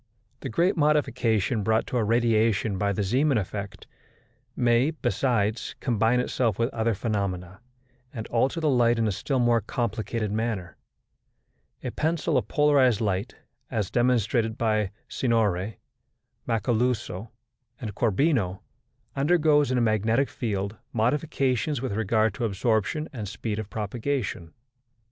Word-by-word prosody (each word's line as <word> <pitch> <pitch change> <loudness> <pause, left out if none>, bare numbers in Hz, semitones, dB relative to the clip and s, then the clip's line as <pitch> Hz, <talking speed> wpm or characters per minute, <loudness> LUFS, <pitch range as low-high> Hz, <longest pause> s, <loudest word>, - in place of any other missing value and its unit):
The - - -5
great 170 - +2
modification 125 - +1
brought 110 +2 +1
to 125 - -2
a 115 - +2
radiation 110 -3 +2
by 100 +1 +1
the 100 +1 -1
Zeeman 130 +7 +2
effect 100 -1 -5 0.7
may, 120 +3 +3
besides, 120 -8 -1
combine 115 -1 +2
itself 120 -4 0
with 115 +3 0
other 115 -1 0
phenomena, 95 -4 -3 0.5
and 110 -4 -6
alter 130 +7 +1
the 160 - 0
light 120 -2 +3
in 115 -1 +1
a - - +1
still 135 +8 -2
more 120 -2 +3
complicated 110 0 -2
manner. 105 -5 -2 1.1
A - - -3
pencil 160 0 0
of 125 - +1
polarized 140 -6 +3
light, 100 -3 -1 0.3
as 105 -4 -2
demonstrated 120 -2 +1
by 110 -3 +1 0.2
Signori 110 -5 0 0.7
Macaluzo 115 -2 -1 0.5
and 110 -4 -5
Corbino, 110 - +1 0.5
undergoes, 150 -1 +3
in 130 - +1
a - - +2
magnetic 110 +4 +2
field, 100 -2 -3 0.2
modifications 135 +2 0
with 130 -1 -3
regard 110 +1 +1
to 125 -4 -2
absorption 110 +8 0
and 110 -6 -5
speed 105 +2 -4
of 110 -2 -6
propagation. 110 -4 -3
115 Hz, 130 wpm, -26 LUFS, 105-125 Hz, 1.1 s, may